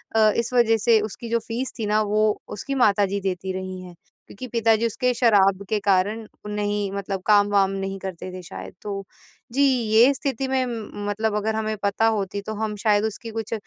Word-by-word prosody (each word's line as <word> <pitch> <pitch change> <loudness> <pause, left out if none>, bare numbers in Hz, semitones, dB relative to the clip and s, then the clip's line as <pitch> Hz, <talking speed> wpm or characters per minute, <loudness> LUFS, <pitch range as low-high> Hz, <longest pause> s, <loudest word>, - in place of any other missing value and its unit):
अ, 215 -1 +5
इस 235 +2 -1
वज़ह 225 -2 +4
से 225 +1 +4
उसकी 220 +2 -6
जो 235 0 +2
फीस 250 +3 -3
थी 215 - -1
ना 210 +1 +2
वो 215 +1 +2 0.2
उसकी 275 +7 -5
माता 205 -5 +4
जी 200 +1 -2
देती 190 0 -2
रही 185 0 -5
हैं 180 -1 -11 0.3
क्योंकि 255 +6 -8
पिताजी 225 -1 +2
उसके 250 +2 0
शराब 200 -5 +3
के 215 - +1
कारण 205 +3 +1 0.2
नहीं 205 -1 -2
मतलब 195 -1 -4
काम-वाम 205 -2 +4
नहीं 195 0 -4
करते 185 -1 -6
थे 185 - -7
शायद। 95 - -9
तो 200 -1 -4 0.5
जी 280 - +1
ये 245 -1 +4
स्थिति 270 -1 -3
में 260 -1 +1
म 215 -3 -6
मतलब 215 +1 -1
अगर 220 +1 -1
हमें 215 0 -1
पता 200 +2 +1
होती 200 0 -3
तो 220 - -3
हम 215 0 -2
शायद 210 -1 +3
उसकी 225 +1 -5
कुछ 225 0 -4
210 Hz, 200 wpm, -23 LUFS, 195-225 Hz, 0.5 s, अ